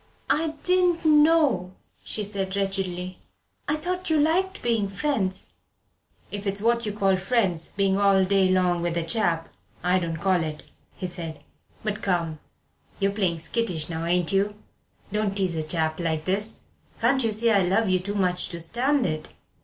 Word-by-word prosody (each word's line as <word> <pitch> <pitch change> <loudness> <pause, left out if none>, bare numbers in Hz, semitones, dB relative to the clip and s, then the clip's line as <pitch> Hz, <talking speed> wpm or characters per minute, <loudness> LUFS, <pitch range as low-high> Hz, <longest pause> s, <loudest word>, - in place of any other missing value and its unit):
"I 315 0 0
didn't 360 -2 +2
know," 300 - +4 0.3
she 215 - -1
said 195 -1 -2
wretchedly. 185 -2 -2 0.5
"I 295 - +1
thought 360 +4 -3
you 315 - +3
liked 370 +6 +1
being 230 -4 +1
friends." 195 -3 -1 0.8
"If 205 0 -4
it's 195 +1 0
what 235 +1 +1
you - - -1
call 195 -2 +2
'friends,' 190 -4 +1
being 195 -1 +2
all 195 -1 +4
day 190 -1 +3
long 180 -2 +2
with 170 0 -1
a 170 - 0
chap, 165 -2 0 0.4
I 180 +1 +3
don't 165 -2 -3
so 160 - -9
call 185 -3 +3
it," 155 -1 -5 0.3
he 185 - -5
said. 165 -4 -6 0.4
"But 215 -1 -3
come 170 -5 -1 0.6
you're 195 0 +2
playing 185 -5 0
skittish 175 -5 -1
now, 165 0 -3
ain't 175 -1 +1
you? 200 +2 +1 0.6
Don't 210 -2 0
tease 190 -3 0
a 160 - -1
chap 160 0 -1
like 160 -2 -1
this. 205 +4 0 0.4
Can't 260 +3 +3
you 225 - +1
see 225 +2 +3
I 200 -3 +4
love 195 +5 +2
you 185 -1 +2
too 200 +3 -4
much 180 -3 0
to 170 -2 -6
stand 250 - +1
it? 155 -2 -3
195 Hz, 175 wpm, -25 LUFS, 175-230 Hz, 0.8 s, know